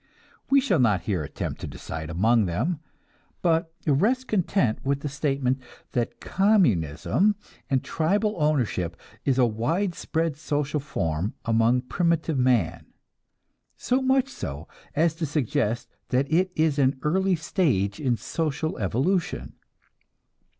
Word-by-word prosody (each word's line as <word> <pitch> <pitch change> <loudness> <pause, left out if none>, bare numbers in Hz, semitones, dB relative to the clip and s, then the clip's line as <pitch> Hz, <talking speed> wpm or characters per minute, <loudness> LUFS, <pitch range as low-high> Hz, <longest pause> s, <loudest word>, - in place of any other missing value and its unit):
We 275 - +6
shall 225 - +1
not 105 -7 +3
here 95 -6 -1
attempt - - -5
to - - -4
decide 80 -1 -6
among 110 +5 +3
them, 130 - -1 0.6
but 165 -1 +2
rest 215 - +2
content 170 - +1
with 140 0 0
the 150 - -3
statement 135 -2 0 0.3
that 120 -2 -2
communism 190 - +2 0.3
and 130 -2 +1
tribal 205 +7 +1
ownership 120 - 0 0.3
is 135 -2 +2
a 130 - +5
widespread 160 - -1
social 150 -1 -1
form 95 - -2
among 115 +2 +3
primitive 165 +1 0
man, 125 -9 +1 0.9
so 255 +2 +1
much 265 0 +3
so 75 - -6 0.3
as 160 +2 +3
to 165 -2 -2
suggest 130 -5 0 0.2
that 130 +2 +2
it 185 +3 +3
is 155 -2 +2
an 135 0 +3
early 190 +4 +2
stage 135 - 0
in 125 -5 +1
social 160 +2 -2
evolution. 140 - 0
145 Hz, 125 wpm, -25 LUFS, 115-170 Hz, 0.9 s, We